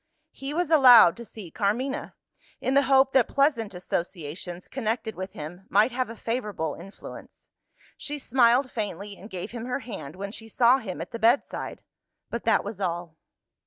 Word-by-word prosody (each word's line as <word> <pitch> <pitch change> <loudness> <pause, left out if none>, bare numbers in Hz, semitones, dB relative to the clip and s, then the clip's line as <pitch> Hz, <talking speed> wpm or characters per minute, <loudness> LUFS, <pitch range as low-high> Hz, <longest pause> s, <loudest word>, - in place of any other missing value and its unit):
He 270 +1 -6
was 330 +1 -1
allowed 250 - +8
to 235 - -7
see 200 -6 -10
Carmina, 250 - -2 0.4
in 260 - -1
the 280 - +6
hope 270 0 +5
that 260 -4 +4
pleasant 260 -8 +1
associations 175 0 -5
connected 225 -3 -2
with 190 0 -7
him 175 +6 -9
might 215 +5 +4
have 250 -1 -2
a 230 - -7
favourable 210 - -3
influence. 195 +4 -12 0.5
She 295 0 -5
smiled 255 0 +3
faintly, 205 -2 -4
and 205 +3 -12
gave 185 -3 -6
him 235 -1 -6
her 250 +2 -2
hand 180 - -8
when 200 +1 -6
she 225 +1 -10
saw 240 +4 +4
him 195 -7 -6
at - - -7
the 230 - -5
bedside 235 +5 +1 0.5
but 235 - -4
that 225 - +3
was 205 -1 -7
all. 175 -3 -3
225 Hz, 170 wpm, -26 LUFS, 190-255 Hz, 0.5 s, allowed